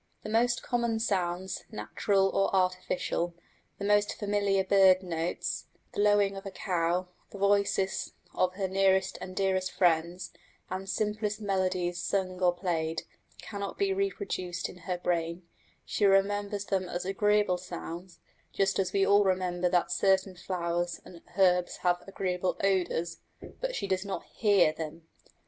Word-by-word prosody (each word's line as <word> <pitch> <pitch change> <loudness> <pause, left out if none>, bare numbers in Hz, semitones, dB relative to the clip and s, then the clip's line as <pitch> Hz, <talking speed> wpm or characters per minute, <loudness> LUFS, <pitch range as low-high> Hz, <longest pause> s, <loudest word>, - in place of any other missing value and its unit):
The - - -5
most 240 +3 +2
common 235 -2 0
sounds, 185 -3 -1
natural 200 -2 +1
or 195 0 +2
artificial, 180 -2 0 0.4
the 200 - -4
most 205 0 +3
familiar 200 -2 +1
bird 190 -1 +5
notes, 170 -1 -3 0.2
the - - -1
lowing 205 -1 +4
of 195 - -7
a 200 - -5
cow, 180 -1 -1 0.2
the - - -10
voices 200 -1 +1 0.2
of 185 0 +1
her 195 -1 -1
nearest 190 0 +2
and 185 - -7
dearest 190 -1 +1
friends, 175 +1 +1 0.4
and 190 +1 -4
simplest 210 0 -1
melodies 185 -3 -1
sung 185 -1 -1
or 180 -1 +5
played, 165 -3 -2 0.4
cannot 200 -2 -5
be 395 -1 +1
reproduced 380 - -2
in - - -11
her 180 - 0
brain: 170 0 -1 0.4
she - - -2
remembers 200 +1 +2
them 190 -3 -1
as 175 +1 -3
agreeable 205 -1 +2
sounds, 175 0 -7 0.3
just 195 0 +1
as 190 - 0
we 195 -1 +3
all 205 +1 +5
remember 180 -2 +1
that 175 -1 +1
certain 190 -1 +2
flowers 175 -1 -2
and 170 -2 -12 0.2
herbs 180 -2 +3
have 175 -1 +2
agreeable 185 -2 -1
odours; 175 -3 0 0.4
but - - -2
she - - -2
does 190 -1 0
not 200 -1 -4
hear 200 -7 +3
them. 160 +1 -7
190 Hz, 145 wpm, -29 LUFS, 180-200 Hz, 0.4 s, bird